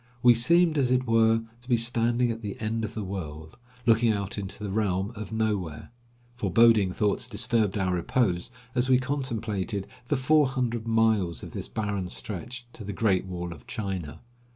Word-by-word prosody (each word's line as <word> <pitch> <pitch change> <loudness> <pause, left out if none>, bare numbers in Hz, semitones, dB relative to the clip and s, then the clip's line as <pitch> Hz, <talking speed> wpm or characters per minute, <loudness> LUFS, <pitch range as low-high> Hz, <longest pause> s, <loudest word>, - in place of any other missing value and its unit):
We 120 -1 +8
seemed, 165 +6 +4
as 130 -3 +2
it 125 0 +2
were, 115 -1 +3 0.2
to 125 - -14
be 120 - +4
standing 120 +1 +2
at 115 0 -6
the 105 -3 -6
end 110 +1 -2
of 110 +1 -5
the 110 - -3
world, 80 -5 -6 0.3
looking 115 -1 +4
out 100 -2 -2
into 100 0 -6
the 100 - -3
realm 100 -1 0
of 110 -2 -7
nowhere. 105 -8 -2 0.4
Foreboding 115 -5 +4
thoughts 105 +3 0
disturbed 110 -2 0
our 95 -2 0
repose, 90 +3 0 0.2
as 125 0 0
we 130 - +6
contemplated 115 -7 -2 0.2
the 145 - +1
four 150 +3 +4
hundred 120 -3 -2
miles 110 -6 +2
of - - -8
this - - -4
barren 100 -4 -2
stretch 120 +7 -6
to 110 - -9
the 100 0 -5
Great 95 -2 +1
Wall 90 -1 -5
of 70 -6 -16
China. 95 -8 -5
110 Hz, 175 wpm, -27 LUFS, 95-120 Hz, 0.4 s, We